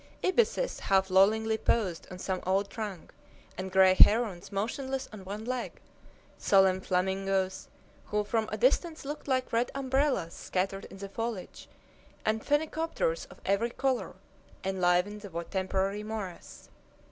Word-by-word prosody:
Ibises 470 Hz, +5 st, +1 dB
half 190 Hz, -1 st, +2 dB
lollingly 220 Hz, +4 st, +4 dB
posed 190 Hz, -9 st, 0 dB
on 185 Hz, -, -8 dB
some 185 Hz, 0 st, -3 dB
old 195 Hz, +2 st, 0 dB
trunk, 210 Hz, -7 st, -6 dB, 0.4 s
and 190 Hz, +1 st, -5 dB
gray 190 Hz, 0 st, +6 dB
herons 205 Hz, -2 st, +4 dB
motionless 260 Hz, +6 st, -2 dB
on 205 Hz, -3 st, -9 dB
one 205 Hz, +3 st, -6 dB
leg, 255 Hz, 0 st, -3 dB, 0.7 s
solemn 190 Hz, -1 st, +4 dB
flamingoes 190 Hz, +1 st, 0 dB, 0.4 s
who 210 Hz, 0 st, 0 dB
from 220 Hz, +1 st, -1 dB
a -, -, -2 dB
distance 345 Hz, -, +1 dB
looked 295 Hz, +2 st, -6 dB
like 255 Hz, -3 st, 0 dB
red 235 Hz, +2 st, +2 dB
umbrellas 265 Hz, -, 0 dB
scattered 195 Hz, +1 st, -2 dB
in -, -, -11 dB
the 200 Hz, 0 st, -6 dB
foliage, 225 Hz, -1 st, -5 dB, 0.6 s
and 220 Hz, +1 st, +1 dB
phenicopters 320 Hz, +11 st, 0 dB
of -, -, -14 dB
every 200 Hz, +4 st, +2 dB
color, 255 Hz, +1 st, -1 dB, 0.5 s
enlivened 190 Hz, +2 st, +1 dB
the 170 Hz, -5 st, -5 dB
temporary 190 Hz, +2 st, -1 dB
morass. 210 Hz, -4 st, -7 dB
205 Hz, 135 wpm, -30 LUFS, 190-245 Hz, 0.7 s, gray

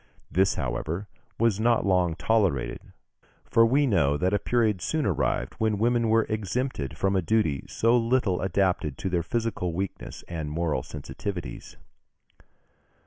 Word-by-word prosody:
This, 95 Hz, +3 st, +3 dB
however, 85 Hz, +6 st, -3 dB, 0.3 s
was 115 Hz, -3 st, +2 dB
not 115 Hz, 0 st, +2 dB
long 90 Hz, -4 st, +2 dB
tolerated, 85 Hz, -, +1 dB, 0.7 s
for 115 Hz, -, +4 dB
we 140 Hz, +5 st, +3 dB
know 80 Hz, -, +2 dB
that 90 Hz, +5 st, 0 dB
a 105 Hz, -, +2 dB
period 110 Hz, -4 st, +1 dB
soon 155 Hz, -, -1 dB
arrived 95 Hz, -8 st, 0 dB
when 110 Hz, -2 st, +1 dB
women 115 Hz, +1 st, +2 dB
were 115 Hz, 0 st, +4 dB
exempted 105 Hz, -, -3 dB
from 95 Hz, 0 st, +1 dB
a 95 Hz, -, +3 dB
duty 85 Hz, -7 st, +1 dB
so 115 Hz, +2 st, +2 dB
little 115 Hz, -6 st, +1 dB
adapted 90 Hz, -6 st, 0 dB
to 95 Hz, -, -3 dB
their 90 Hz, -2 st, +1 dB
physical 110 Hz, -2 st, -2 dB
weakness 95 Hz, +3 st, -5 dB
and 80 Hz, -3 st, -4 dB
moral 80 Hz, +1 st, -1 dB
sensitiveness. 80 Hz, 0 st, -7 dB
95 Hz, 140 wpm, -26 LUFS, 85-115 Hz, 0.7 s, for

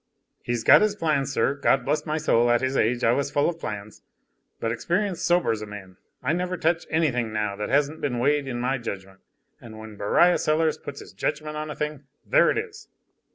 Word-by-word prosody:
"He's 120 Hz, -1 st, -2 dB
got -, -, +7 dB
his 210 Hz, -1 st, +2 dB
plans, 150 Hz, -7 st, 0 dB
sir. 135 Hz, -, +1 dB
God 140 Hz, -1 st, +1 dB
bless 150 Hz, +1 st, -1 dB
my 155 Hz, +1 st, -1 dB
soul, 120 Hz, -6 st, +2 dB
at 120 Hz, -1 st, +3 dB
his 130 Hz, +1 st, -1 dB
age, 120 Hz, +1 st, +1 dB
I 115 Hz, -, +4 dB
was 140 Hz, +3 st, 0 dB
full 145 Hz, 0 st, +1 dB
of 165 Hz, -1 st, -3 dB
plans. 105 Hz, -6 st, -7 dB, 0.6 s
But 115 Hz, -, -1 dB
experience 175 Hz, -, -1 dB
sobers 170 Hz, -12 st, +1 dB
a 105 Hz, -, -6 dB
man, 95 Hz, -3 st, -10 dB, 0.3 s
I 155 Hz, -, +1 dB
never 180 Hz, +1 st, -2 dB
touch 165 Hz, +1 st, 0 dB
any 160 Hz, -2 st, +2 dB
thing 120 Hz, -2 st, -2 dB
now 105 Hz, -2 st, -2 dB
that 105 Hz, -, -4 dB
hasn't 145 Hz, +3 st, +1 dB
been 130 Hz, -4 st, -1 dB
weighed 140 Hz, +3 st, +1 dB
in 120 Hz, -2 st, -3 dB
my 130 Hz, +2 st, -1 dB
judgment; 95 Hz, -4 st, -7 dB, 0.4 s
and 110 Hz, -2 st, -11 dB
when 110 Hz, -1 st, -10 dB
Beriah 175 Hz, -, +3 dB
Sellers 155 Hz, 0 st, +1 dB
puts 140 Hz, 0 st, -8 dB
his -, -, -13 dB
judgment 150 Hz, 0 st, -3 dB
on 155 Hz, 0 st, -4 dB
a 150 Hz, -, -5 dB
thing, 150 Hz, -2 st, -4 dB, 0.2 s
there -, -, +4 dB
it -, -, 0 dB
is." 430 Hz, -1 st, -6 dB
140 Hz, 215 wpm, -25 LUFS, 115-160 Hz, 0.6 s, got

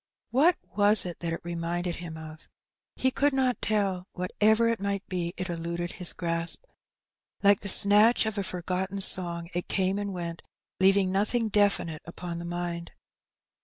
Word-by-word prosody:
What 315 Hz, +8 st, +4 dB, 0.2 s
was 205 Hz, 0 st, +5 dB
it 175 Hz, -2 st, -6 dB
that 170 Hz, -1 st, -3 dB
it 165 Hz, -, -4 dB
reminded 170 Hz, +1 st, -3 dB
him 170 Hz, -2 st, -7 dB
of? 155 Hz, 0 st, -11 dB, 0.5 s
He 260 Hz, -, +1 dB
could 285 Hz, +2 st, +1 dB
not 260 Hz, -2 st, 0 dB
tell; 195 Hz, -4 st, -1 dB
whatever 215 Hz, +5 st, +2 dB
it 230 Hz, 0 st, 0 dB
might 200 Hz, 0 st, -3 dB
be, 175 Hz, -2 st, -3 dB
it 185 Hz, -, -3 dB
eluded 170 Hz, 0 st, -4 dB
his 180 Hz, -2 st, -5 dB
grasp. 170 Hz, -, -1 dB, 0.8 s
Like 200 Hz, 0 st, +5 dB
the 200 Hz, -, -5 dB
snatch 210 Hz, +5 st, +5 dB
of 220 Hz, -1 st, -2 dB
a -, -, -1 dB
forgotten 185 Hz, +2 st, -3 dB
song 170 Hz, -3 st, +3 dB
it 175 Hz, 0 st, -3 dB
came 190 Hz, +1 st, 0 dB
and 200 Hz, -1 st, -3 dB
went, 170 Hz, -2 st, -5 dB, 0.4 s
leaving 190 Hz, 0 st, +4 dB
nothing 215 Hz, +4 st, 0 dB
definite 200 Hz, -7 st, +1 dB
upon 170 Hz, 0 st, -7 dB
the 170 Hz, -, -6 dB
mind. 170 Hz, 0 st, -5 dB
185 Hz, 165 wpm, -27 LUFS, 170-205 Hz, 0.8 s, was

